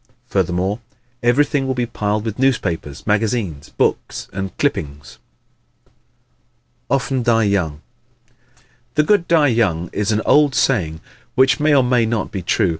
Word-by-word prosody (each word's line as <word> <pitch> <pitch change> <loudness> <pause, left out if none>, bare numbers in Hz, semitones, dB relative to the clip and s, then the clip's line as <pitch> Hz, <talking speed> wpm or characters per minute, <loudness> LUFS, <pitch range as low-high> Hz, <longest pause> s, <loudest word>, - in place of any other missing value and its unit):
Furthermore, 95 +2 0 0.4
everything 135 +3 +2
will 130 - -1
be 125 -1 0
piled 105 -2 -2
with 110 +1 -4
newspapers, 85 - -1
magazines, 105 - -1
books - - -1
and 95 0 -5
clippings. 70 -3 -3 1.7
Often 135 0 0
Die 115 -1 +3
Young 90 -8 0 0.8
¶ - - -29 0.3
"The 150 - +4
good 190 0 +2
die 155 -4 +4
young" 90 -8 0
is 105 +1 0
an 110 0 0
old 145 -2 +4
saying 80 -11 +1 0.3
which 130 +3 +4
may 150 0 +3
or 135 - +5
may 125 -2 +2
not 110 -3 -2
be 95 - -4
true. 90 +1 +1
110 Hz, 140 wpm, -19 LUFS, 95-130 Hz, 1.7 s, or